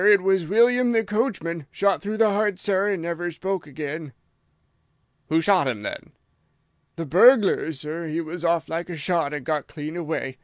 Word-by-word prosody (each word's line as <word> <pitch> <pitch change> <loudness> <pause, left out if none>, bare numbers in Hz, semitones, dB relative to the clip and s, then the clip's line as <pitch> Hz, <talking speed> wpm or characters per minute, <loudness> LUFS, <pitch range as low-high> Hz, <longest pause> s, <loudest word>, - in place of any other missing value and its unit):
It 205 -3 +6
was 190 -3 +2
William 240 +5 +4
the 225 -1 +2
coachman. 195 - -2
Shot 200 -1 +1
through 210 +2 -4
the 220 -1 +4
heart, 205 -1 0
sir, 200 +1 +1
and 185 -5 -3
never 170 +1 -3
spoke 190 +1 -4
again." 150 0 -6 1.2
"Who 160 +1 +3
shot 185 -5 +3
him, 110 -5 -3
then?" - - -7 0.8
"The 165 - -4
burglar, 195 - +5
sir. 155 +3 -6
He 155 +1 -2
was 170 +1 -6
off 170 -1 +1
like 170 +2 -4
a 175 - -5
shot 160 -1 -1
and 145 -3 -5
got 155 -2 -2
clean 155 +1 -7
away. 150 -6 -4
170 Hz, 180 wpm, -24 LUFS, 155-200 Hz, 1.2 s, It